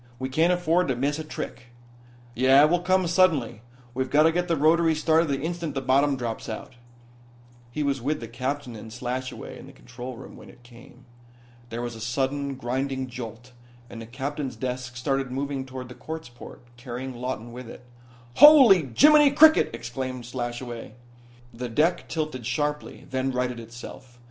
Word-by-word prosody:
We 130 +1 -4
can't 160 +6 +2
afford 175 0 +2
to 130 - 0
miss 140 +5 -1
a - - -4
trick." 130 -5 -7 0.7
"Yeah, 130 +4 +5
it 150 - +4
will 175 - +3
come 185 +1 +2
suddenly. 165 - +2 0.3
We've 130 +1 -2
got 150 +3 +5
to 160 - +5
get 175 +1 -1
the 165 -2 +1
rotaries 160 +1 +3
started 160 +1 +3
the 140 -2 -1
instant 170 -2 -4
the - - 0
bottom 135 +2 +2
drops 115 -3 -5
out." 110 - -7 1.0
He 150 +5 -3
was 140 -2 -1
with 150 +5 -1
the 115 - -7
captain 130 +1 -4
and 110 +1 -10
Slashaway 130 +2 -5
in - - -12
the - - -12
control 125 0 -9
room 130 - -11
when - - -13
it 120 - -18
came. 120 +1 -16 0.6
There 120 +1 -4
was 120 -1 -4
a 110 - -10
sudden, 135 +4 -2
grinding 130 +1 -3
jolt, 120 0 -8 0.4
and 115 - -8
the 115 - -9
captain's 135 +2 -4
desk 125 +1 -5
started 135 +1 -1
moving 135 0 -3
toward 130 -1 -7
the 125 - -10
quartz 160 +1 -8
port, 120 0 -13
carrying 125 +1 -6
Lawton 120 -1 -5
with 125 -1 -9
it. 125 - -12 0.5
"Holy 245 - +8
Jiminy 300 0 +7
cricket," 310 +3 +6
exclaimed 125 +2 -5
Slashaway. 120 -1 -6 0.6
The 120 +1 -5
deck 155 +9 +1
tilted 155 -7 -3
sharply; 150 +4 -3
then 130 0 -1
righted 125 -1 -2
itself. 120 +2 -11
130 Hz, 175 wpm, -25 LUFS, 120-150 Hz, 1.0 s, Holy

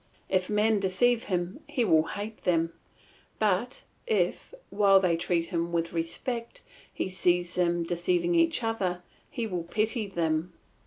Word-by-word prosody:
If 185 -1 +1
men 210 0 +2
deceive 230 +5 +2
him 180 0 -2
he 245 - 0
will 160 -6 +5
hate 215 +2 -6
them; 165 -2 +1 0.6
but, 215 +3 0 0.2
if, 445 -2 0 0.2
while 200 -1 +5
they 180 -3 +2
treat 170 0 -1
him 170 -2 -1
with 170 0 -1
respect, 230 +8 -3 0.3
he - - -3
sees 175 -2 +1
them 175 -1 +1
deceiving 175 0 0
each 165 +7 +3
other, 185 -6 -1 0.3
he 235 - -3
will 180 -5 -3
pity 215 +5 -1
them. 165 -2 -1
180 Hz, 145 wpm, -28 LUFS, 170-215 Hz, 0.6 s, will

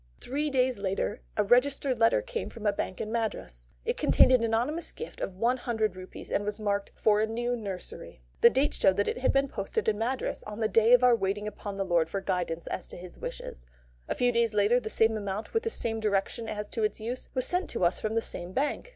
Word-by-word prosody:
Three 295 +4 -2
days 255 -4 +1
later 195 +1 -2 0.2
a 210 - +4
registered 255 +3 +2
letter 230 - +4
came - - -4
from 225 -2 -10
a 205 - +3
bank 185 - -4
in 215 - -4
Madras. 210 - -3 0.2
It - - -1
contained - - +5
an 250 -2 +4
anonymous 240 +9 0
gift 470 - -8
of 190 - -3
one 235 +6 +1
hundred 220 -5 -1
rupees, 185 0 -9
and 205 - +1
was 210 +1 -3
marked, 200 -1 -1
"For 210 -1 +3
a 220 - +1
new 240 +2 -1
nursery." 195 - -7 0.2
The 235 - +9
date 270 +4 +1
showed 190 0 +3
that 205 - +1
it - - -1
had 260 - +2
been 275 0 +2
posted 445 - -3
in 210 -1 +1
Madras 250 +3 -2
on 210 +1 -8
the 220 - +2
day 225 +2 +4
of 250 0 +6
our 250 -1 +7
waiting 205 0 -2
upon 205 -1 -6
God 175 -4 +1
for 195 - -2
guidance 175 -3 -2
as - - -4
to - - -8
His 180 0 -10
wishes. - - -7 0.4
A - - -2
few 245 0 +2
days 230 -2 +1
later, 210 +4 +4
the 220 - -5
same 225 0 +3
amount, 205 0 -4
with 450 - +2
the 455 - -2
same 225 - -1
direction 215 +2 -1
as 210 0 -4
to 225 - -2
its 215 - 0
use, 240 +4 -5
was 255 - +3
sent 360 +1 0
to 180 - 0
us 175 - +2
from 215 0 -2
the 230 - +2
same 175 +2 -2
bank. 295 - -1
220 Hz, 235 wpm, -29 LUFS, 200-250 Hz, 0.4 s, The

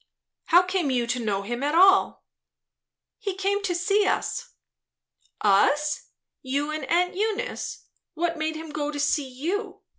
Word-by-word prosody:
"How 350 +2 +6
came 365 -4 -1
you 245 -2 +1
to 245 +1 -1
know 200 -2 -1
him 240 +4 -4
at 295 +3 0
all?" 385 +2 +5 0.9
"He 400 -5 -3
came 395 +1 0
to 375 -3 -1
see 395 +4 +2
us?" - - -1 0.9
"Us? 290 +9 +2 0.3
You 280 +3 -2
and 310 -2 -4
aunt 355 +5 +1
Eunice? 440 +5 -3 0.3
What 340 0 -1
made 315 0 -2
him 315 0 -7
go 295 0 -2
to 295 -1 -5
see 290 -1 +1
you? 380 - -4
315 Hz, 150 wpm, -25 LUFS, 280-385 Hz, 0.9 s, How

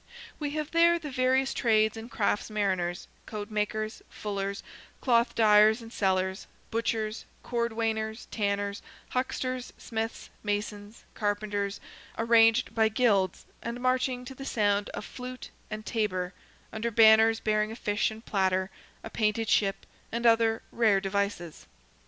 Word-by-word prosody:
We 295 -2 -2
have 305 -1 -3
there 340 +1 +5
the 305 -4 -7
various 260 +1 +2
trades 220 -2 +2
and 225 +1 -8
crafts 205 -2 0
mariners, 190 -4 -1 0.2
coat 210 0 -6
makers, 215 +1 -2
fullers, 200 -1 -4 0.4
cloth 235 -2 +2
dyers 215 0 +6
and 230 0 -11
sellers, 190 0 0 0.2
butchers, 225 -1 -1 0.2
cordwainers, 225 -1 -2
tanners, 200 -1 -1 0.3
hucksters, 255 0 -2
smiths, 225 0 -5
masons, 205 +1 -4
carpenters, 205 -1 -2 0.4
arranged 225 +1 +4
by 220 -1 +3
guilds, 210 -5 +1 0.2
and 235 +1 -5
marching 255 0 0
to 265 - -7
the 270 - -9
sound 205 -5 +1
of 205 - -6
flute 255 0 -8 0.2
and 215 0 -6
tabor, 185 -5 -1 0.4
under 220 +2 -2
banners 225 0 +6
bearing 215 0 +1
a - - -6
fish 205 -2 0
and 220 +1 -10
platter, 190 -1 +1 0.3
a - - -6
painted 215 0 0
ship, 195 -1 +1 0.3
and 235 +1 -2
other 225 -1 +4
"rare 220 -4 +3
devices." 195 -4 -3
220 Hz, 135 wpm, -28 LUFS, 205-235 Hz, 0.4 s, dyers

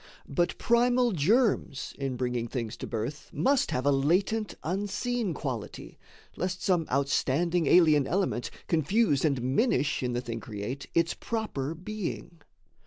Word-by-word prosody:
But 175 +5 0
primal 245 +1 +3
germs 195 - +1
in 135 -2 -2
bringing 125 -1 -2
things 115 -2 -4
to - - -6
birth 120 +6 -4
Must 275 0 +2
have 125 +1 -1
a 145 - +5
latent, 185 +10 +1
unseen 205 +3 -1
quality, 125 -8 -6 0.4
Lest 180 0 -3
some 175 -4 +2
outstanding 145 +5 +1
alien 155 -5 +5
element 180 -9 0 0.2
Confuse 165 - +2
and 140 -5 +2
minish 145 - +1
in 125 -1 -1
the 120 - -1
thing 115 -2 -5
create 110 +6 -6
Its 170 0 +3
proper 165 - -3
being. 180 -3 -6
160 Hz, 135 wpm, -28 LUFS, 130-200 Hz, 0.4 s, a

